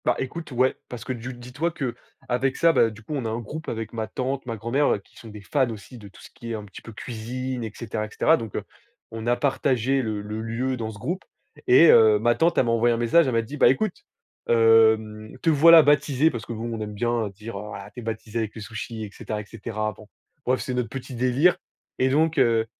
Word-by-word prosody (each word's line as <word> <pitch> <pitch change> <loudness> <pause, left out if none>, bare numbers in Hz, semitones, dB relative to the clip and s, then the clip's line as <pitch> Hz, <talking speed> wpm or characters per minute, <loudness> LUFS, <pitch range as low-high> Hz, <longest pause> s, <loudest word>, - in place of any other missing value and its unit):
Bah, - - +3
écoute, 155 +4 -5
ouais, 130 +1 +2
parce 120 -3 -7
que 130 - -3
du 120 +1 -6
dis-toi 125 +6 -3
qu'avec 130 -2 -3
ça, 170 - +5
bah, 115 - +4
du 110 0 -13
coup, 150 - -6
on 135 -5 -2
a - - -1
un 110 - -2
groupe 150 +8 -7
avec 115 0 -5
ma 110 -1 -3
tante, 130 +3 -3
ma 115 - -3
grand-mère, 120 +7 +1
heu, - - -3
qui 100 - -20
sont 115 - -12
des 105 -1 -10
fans 130 +6 0
aussi 115 +3 -9
de 105 - -11
tout 100 - -16
ce - - -13
qui 115 0 -8
est - - -2
un 105 -1 -7
petit 100 - -12
peu 115 - -11
cuisine, 120 +3 -5
et 110 - -5
cetera, 110 -3 -4
et - - -10
cetera, 160 - +3
donc 115 -8 -7
heu, - - -2 0.5
on 115 0 -6
a 120 - +3
partagé 135 -1 +1
le 110 -4 -3
le 105 +1 -5
lieu 120 +4 -2
dans 115 -3 -4
ce 105 - -9
groupe 175 - -4 0.4
et 130 +7 +7
heu, 110 -1 +6
ma 120 +3 +2
tante 165 +6 +1
elle - - +4
m'a 115 - +1
envoyé 115 +1 +3
un - - -3
message. 120 +7 +4
Elle 130 - 0
m'a 115 - +3
dit: 140 +7 -8
«Bah, - - +6
écoute, 210 +7 +1 0.5
hem, 110 -1 +3
te - - +3
voilà 160 +2 +8
baptisé.» 145 +1 +3
parce 115 -3 -6
que, - - -4
bon, 115 +1 -4
on 115 - -4
aime 105 -1 -5
bien 120 +1 0
dire: 105 +2 -8
«Ah 100 -1 -8
tu - - -9
es - - -8
baptisé 115 0 -4
avec 110 -2 -3
le 110 - -7
sushi, 110 +1 -6
et 105 - -7
cetera, 105 +1 -5
et - - -12
cetera». 110 0 -4
Bon 110 - -14 0.4
bref, 130 +1 +1
c'est 130 - -4
notre 125 -3 -1
petit 135 +1 -7
délire, 130 +8 +3 0.4
et 130 - +3
donc 155 +2 +2
heu, 115 -1 +3
115 Hz, 255 wpm, -24 LUFS, 110-130 Hz, 0.5 s, voilà